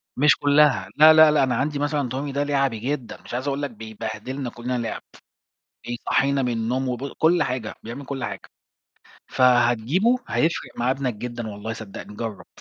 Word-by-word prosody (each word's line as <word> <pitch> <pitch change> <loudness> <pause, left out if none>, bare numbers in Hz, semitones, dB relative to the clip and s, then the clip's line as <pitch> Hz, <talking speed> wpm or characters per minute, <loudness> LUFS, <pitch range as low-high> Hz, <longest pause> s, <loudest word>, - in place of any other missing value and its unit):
مش 145 +2 +5
كُلّها، 145 -10 +3
لا، 155 +1 +9
لا، 155 -1 +7
لأ، 150 -2 +3
أنا 130 -1 +1
عَندي 145 +1 -1
مثلًا 145 -3 -1
Tommy 135 +2 -4
ده 145 +1 0
لِعَبي 135 -5 0
جدًا، 130 -1 -4
مش - - -11
عايز 130 +3 -3
أقول 140 0 -1
لك 145 - -2
بيبهدلنا 110 +4 -6
كُلّنا 125 +2 -4
لعب، 115 -1 -4 0.9
بيصحينا 135 +3 0
من 125 -1 0
النوم 125 +4 -1
وبُ 125 +3 -4
كُلّ 170 +2 +3
حاجة، 125 -4 -4
بيعمل 125 +5 -7
كُلّ 135 -2 -5
حاجة. - - -6 0.8
فهتجيبه 125 - +3
هيفرق 165 +2 -1
مع 125 +2 +1
ابنك 135 -3 -1
جدًا 120 +1 -6
والله 105 +2 -6
صدقني 105 -1 -9
جرَّب. 110 -5 -6
130 Hz, 170 wpm, -23 LUFS, 115-145 Hz, 0.9 s, لا